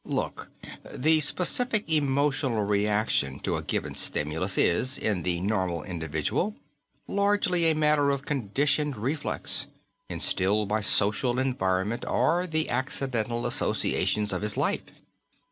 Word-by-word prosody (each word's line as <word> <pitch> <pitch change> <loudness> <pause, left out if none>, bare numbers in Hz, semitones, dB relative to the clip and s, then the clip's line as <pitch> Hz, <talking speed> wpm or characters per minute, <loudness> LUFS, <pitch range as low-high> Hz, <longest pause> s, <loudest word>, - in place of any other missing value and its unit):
"Look, - - -4 0.4
the 155 +4 +3
specific 215 - +1
emotional 140 -5 +1
reaction 105 -9 0
to - - -1
a - - -4
given - - -3
stimulus 80 +6 -1
is, 130 +10 +2
in 105 -5 -1
the 85 +1 -1
normal 95 -5 -1
individual, 80 - -2 0.5
largely 200 -4 +2
a 160 - +2
matter 150 -2 +3
of 140 0 -2
conditioned 145 +2 0
reflex, 135 +8 -2 0.4
instilled 100 +3 0
by 110 +1 0
social 110 +4 +3
environment 115 -5 -1
or 175 +2 +1
the 160 -1 -1
accidental 120 -3 -1
associations 105 -1 0
of - - -2
his 105 -1 -1
life. - - +1
120 Hz, 120 wpm, -27 LUFS, 100-150 Hz, 0.5 s, the